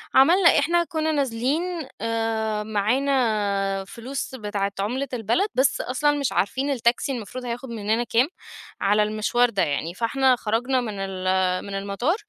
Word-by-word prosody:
عملنا 340 +6 +6
إحنا 340 +4 +2
كُنّا 315 -1 -1
نازلين 275 +2 0 0.4
آآ 225 -2 -1
معانا 210 -3 0
فلوس 260 +4 -6
بتاعة 205 -4 -2
عُملة 250 +8 -1
البلد، 235 - +1
بس 260 +2 +2
أصلًا 280 +4 +1
مش 280 - 0
عارفين 265 +8 0
التاكسي 240 +1 +1
المفروض 250 +1 -6
هياخد 245 +2 -5
منّنا 220 +1 -1
كام، 240 +2 +2 0.5
على 205 +1 +3
المشوار 215 +3 +1
ده 200 -4 -1
يعني؟ 155 +4 -2
فإحنا 255 +5 +2
خرجنا 245 +3 0
من 215 -4 -5
ال 185 -1 0
من 200 -1 -5
المطار، 200 - -1
230 Hz, 140 wpm, -24 LUFS, 205-265 Hz, 0.5 s, عملنا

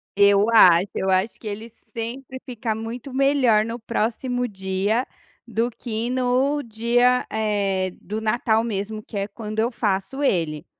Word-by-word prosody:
Eu 200 +2 +5
acho, 180 -4 +7
eu 190 - -1
acho 190 +4 +1
que 220 - -9
ele 215 +3 -6 0.2
sempre 250 +3 -6
fica 235 -4 -3
muito 235 +4 -6
melhor 265 -5 +3
no 230 +1 -5
próximo 245 +2 -1
dia, 195 +4 -1 0.4
do 230 +1 0
que 230 0 -4
no 255 +3 +1
dia, 240 +2 +2
eh, 200 -4 0
do 215 +2 -4
natal 220 0 +1
mesmo 215 -1 -3
que 210 - -8
é 195 - -1
quando 215 0 -6
eu 230 +3 +1
faço 205 +3 -2
ele. 165 - 0
220 Hz, 150 wpm, -23 LUFS, 205-245 Hz, 0.4 s, acho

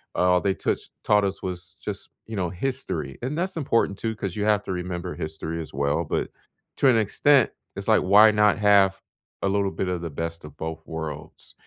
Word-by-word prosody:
All 90 0 +3
they 100 -1 +1
touch - - -2
taught 105 -1 +4
us 95 -1 -2
was 90 -2 -5
just, - - -5 0.2
you 110 - -7
know, 90 -4 -1
history, 90 - -3
and 135 +6 -3
that's 185 +1 -1
important 115 -9 +1
too 110 -1 -2
'cause 100 -4 -4
you 105 - -1
have 105 -1 +3
to - - -4
remember 90 0 -4
history 80 +1 -4
as 80 - -8
well, 70 +4 0
but - - -2 0.5
to 140 - +4
an 120 - +5
extent, 125 +4 +3 0.2
it's - - -6
like, - - +5
why 105 +3 +7
not 105 -1 +4
have 100 -2 +4 0.4
a - - +2
little 100 0 +1
bit 95 - -3
of 90 -2 -2
the 85 - -4
best 85 +2 -5
of 75 -1 -12
both 80 0 -5
worlds? 80 -2 -7
95 Hz, 205 wpm, -25 LUFS, 85-105 Hz, 0.5 s, why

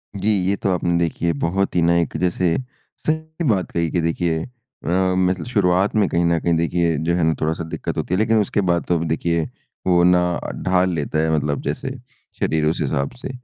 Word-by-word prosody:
जी। 100 +2 0 0.2
ये 100 - +2
तो 100 - -2
आपने 85 -1 +1
देखिए 85 0 0
बहुत 95 +3 0
ही 90 - +3
ना 85 +1 +3
एक 85 - -2
जैसे 90 0 +1 0.4
सही 160 +1 -3
बात 95 -4 0
कही 85 -1 0
कि 85 - +1
देखिए 85 0 0 0.4
अ, - - -3 0.3
मतलब 95 0 +1
शुरुआत 100 -4 +2
में 105 -3 +3
कहीं 85 0 +1
न 85 -1 +2
कहीं 85 0 +1
देखिए 85 0 +1
जो 85 - +2
है 85 - +1
ना 80 - +3
थोड़ा-सा 80 +1 -1
दिक्कत - - -4
होती - - -2
है। - - +3
लेकिन 110 +1 +3
उसके 100 0 0
बाद 85 0 +2
तो 90 - +2
अब - - -2
देखिए 85 +1 0 0.5
वो 90 -1 +4
ना 90 0 +5 0.4
ढाल 90 0 +3
लेता 75 -1 -1
है, 80 0 +1
मतलब 70 -1 -1
जैसे - - -3 0.5
शरीर 80 -1 +1
उस 80 +2 +1
हिसाब 70 -1 -1
से। - - -5
85 Hz, 210 wpm, -21 LUFS, 80-95 Hz, 0.5 s, ना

